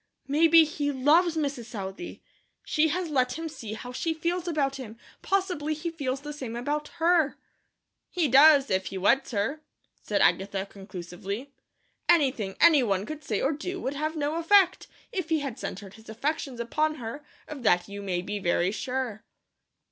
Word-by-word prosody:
"Maybe 325 +3 +6
he 290 -2 -2
LOVES 315 +6 +3
Mrs. 280 -6 -2
Southey. 200 - -7 0.4
She 310 +1 +2
has 335 +1 -2
let 255 -2 +1
him 325 0 -4
see 265 -9 -7
how 245 +3 -7
she 320 +6 -2
feels 345 +2 -2
about 280 -5 0
him; 230 -4 -9 0.2
possibly 360 -6 -1
he 335 +3 -4
feels 275 -4 -3
the 295 +1 -6
same 255 -6 -6
about 295 +5 -2
her." 330 -3 +3 0.7
"He 345 -4 +1
does, 280 +1 +6
if 190 0 +1
he 195 - -5
weds 235 +8 +2
her," 240 +8 -2 0.4
said - - 0
Agatha, 195 0 +1
conclusively. 195 +5 -7 0.6
"Anything 260 - +2
any 320 -4 +7
one 200 -4 0
could 305 +3 -7
say 215 -7 -1
or 275 - +2
do 360 +5 -4
would 270 - -3
have 310 +3 -2
no 300 +1 -1
effect, 375 +2 +4 0.2
if 370 -8 -3
he 320 -2 +2
had 275 -4 -5
centred 195 0 -6
his 220 0 -15
affections 270 +2 -3
upon 305 +6 0
her, 250 +2 -7 0.2
of 295 -3 -7
that 175 -6 +3
you 200 0 -7
may 180 -3 -2
be 205 +2 -4
very 175 0 +1
sure." 245 -1 -3
275 Hz, 170 wpm, -27 LUFS, 220-315 Hz, 0.7 s, any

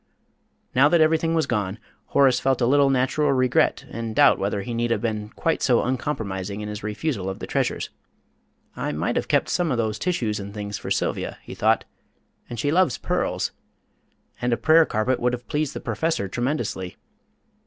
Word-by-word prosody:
Now 135 +4 +5
that 170 - +4
everything 160 +1 +3
was 160 -2 +2
gone, 105 -6 -2 0.3
Horace 135 -3 +4
felt 135 -1 +1
a 120 - +2
little 140 +2 +4
natural 135 +3 +2
regret 130 -1 +2
and 115 -1 -5
doubt - - +5
whether 100 0 -1
he 120 - -5
need 120 +1 0
have 115 - 0
been 110 -2 -2
quite 165 +7 -1
so 120 -3 +3
uncompromising 105 -7 -3
in 105 - -5
his 105 0 -6
refusal 105 -1 -2
of 95 - -5
the - - -6
treasures. - - -1 0.8
"I - - -3
might - - -1
have - - -1
kept - - +2
some 175 -4 0
of 125 - 0
those 110 -2 -1
tissues 115 - -1
and 100 +1 -8
things 105 -1 -4
for - - -6
Sylvia," - - -1
he - - -9
thought; - - +2 0.6
"and 120 - -6
she 145 +5 +1
loves 180 -4 +3
pearls. - - -1 0.9
And 125 - 0
a 120 - +2
prayer 160 0 +5
carpet 120 +4 0
would 125 0 +1
have 125 0 -5
pleased 150 -1 -1
the - - -3
Professor 160 -11 -1
tremendously. 120 -6 -3
120 Hz, 185 wpm, -24 LUFS, 105-145 Hz, 0.9 s, Now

